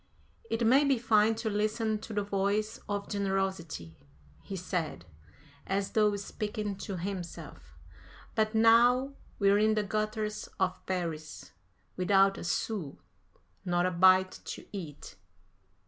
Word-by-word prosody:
"It 225 +1 0
may 265 +5 +6
be 275 -2 +3
fine 220 -1 +3
to 225 0 -2
listen 215 +1 0
to 220 - -9
the 205 -1 -1
voice 200 +2 -1
of 205 -1 -2
generosity," 190 - -2 0.5
he 195 - -7
said, 180 -3 -3 0.6
as 195 +1 -1
though 210 -2 +3
speaking 210 0 -4
to 195 -1 -5
himself, 180 -1 -7 0.6
"but 215 0 0
now 240 +4 +5 0.2
we're 200 0 +4
in 215 0 +3
the 210 - +1
gutters 215 +1 -2
of 185 -1 0
Paris, 165 -4 -4 0.5
without 195 +1 +3
a - - -6
sou; 175 -4 -2 0.7
not 175 -1 +1
a 185 - +1
bite 185 +1 +4
to - - -7
eat.... 150 - -8
200 Hz, 130 wpm, -30 LUFS, 185-215 Hz, 0.7 s, may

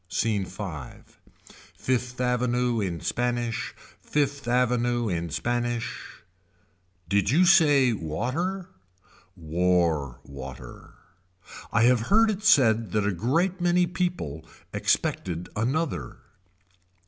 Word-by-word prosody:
Scene 100 +1 0
V. 95 +3 -7 1.1
Fifth 125 -1 -2
Avenue 125 -1 +1
in 90 -5 -3
Spanish. 120 -2 -2 0.3
Fifth 140 -2 -1
Avenue 120 -1 +1
in 85 -3 -2
Spanish. 120 +6 -3 0.8
Did 100 +1 +1
you 170 +7 +4
say 145 -9 +5
water. 130 - -3 0.7
War 85 -5 0
water. 65 -1 -10 0.8
I 110 - +3
have 125 0 +5
heard 220 +2 +5
it 205 -1 -5
said 115 - +4
that 105 -1 +1
a 105 - +1
great 165 - 0
many 175 0 +3
people 175 - -3 0.3
expected 90 -1 -1
another. 115 - -2
120 Hz, 100 wpm, -26 LUFS, 90-140 Hz, 1.1 s, say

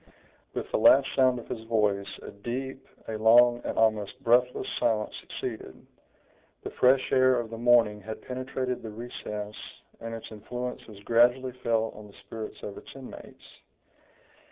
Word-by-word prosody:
With - - -2
the - - +1
last 135 0 +7
sound 130 -1 +4
of 120 - -9
his 110 - -5
voice, 105 -3 +1 0.2
a - - -8
deep, 130 +6 -6 0.2
a 110 - -3
long, 120 +2 +6
and - - -4
almost 110 -2 +1
breathless 125 +2 +3
silence 110 -3 0
succeeded. 110 - -7 0.8
The - - -5
fresh 130 +1 +3
air 130 -1 +4
of 115 -1 -5
the 115 - -6
morning 115 -3 +4
had 110 +2 -8
penetrated 130 0 -3
the 110 - -7
recess, 105 -2 -6 0.4
and 115 0 -6
its 115 - -9
influence 125 +4 -6
was 105 -3 -12
gradually 125 +3 +3
felt 115 -1 0
on 105 0 -11
the 100 - -17
spirits 110 +1 -8
of 100 - -6
its - - -15
inmates. 135 -2 -11
115 Hz, 155 wpm, -28 LUFS, 110-125 Hz, 0.8 s, last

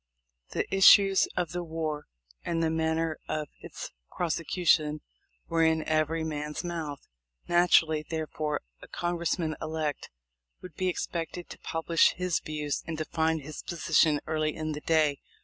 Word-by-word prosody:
The - - 0
issues 195 0 +7
of 175 -3 0
the 175 0 -3
war 160 -2 -4 0.4
and 165 -1 -1
the 160 - +1
manner 160 0 0
of 150 -2 -2
its - - -8 0.3
prose 170 -3 0
cution 155 -4 +3 0.5
were 165 -1 +2
in 160 -1 +3
every 155 +1 +1
man's 150 0 -4
mouth. 160 -5 -5 0.4
Naturally, 165 -3 +4
therefore, 155 -1 -3 0.2
a - - -11
Congressman 170 -2 -1
elect 155 -2 -3 0.5
would 180 -3 -10
be 185 +4 -1
expected 175 -1 -3
to - - -9
publish 165 0 +2
his 180 -2 0
views 150 -2 -3
and 165 -1 -3
define 160 0 0
his 150 +2 -8
position 160 -3 +2
early 155 -1 -1
in 155 0 -3
the 150 0 -5
day. 155 -3 +2
160 Hz, 145 wpm, -29 LUFS, 155-170 Hz, 0.5 s, issues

